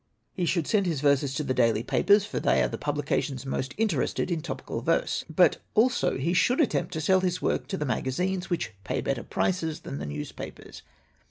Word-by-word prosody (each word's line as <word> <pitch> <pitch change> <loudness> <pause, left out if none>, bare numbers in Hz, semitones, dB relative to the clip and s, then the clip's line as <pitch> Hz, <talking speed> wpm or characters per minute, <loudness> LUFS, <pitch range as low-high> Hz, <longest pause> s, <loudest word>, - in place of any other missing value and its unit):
"He 180 -3 -1
should 170 -1 +1
send 200 -4 +2
his 160 -5 -1
verses 140 -1 +2
to 150 - -1
the 130 - -1
daily 115 -3 +2
papers, 205 - +3
for 210 - -3
they - - +3
are - - +2
the - - -5
publications 145 -2 -2
most 135 0 -3
interested 190 - 0
in 165 -2 -1
topical 170 - -5
verse. - - 0
But - - +4 0.2
also 240 +3 +3
he 160 +7 0
should 215 - +3
attempt 305 - +1
to 160 - -2
sell 190 +5 +4
his 185 -1 -1
work - - -1
to 190 - -3
the 150 - -2
magazines, 180 +9 -1
which 170 - -2
pay - - -2
better - - -1
prices 165 -4 -1
than 70 - -6
the 75 - -5
newspapers. 75 0 -7
160 Hz, 200 wpm, -27 LUFS, 135-190 Hz, 0.2 s, But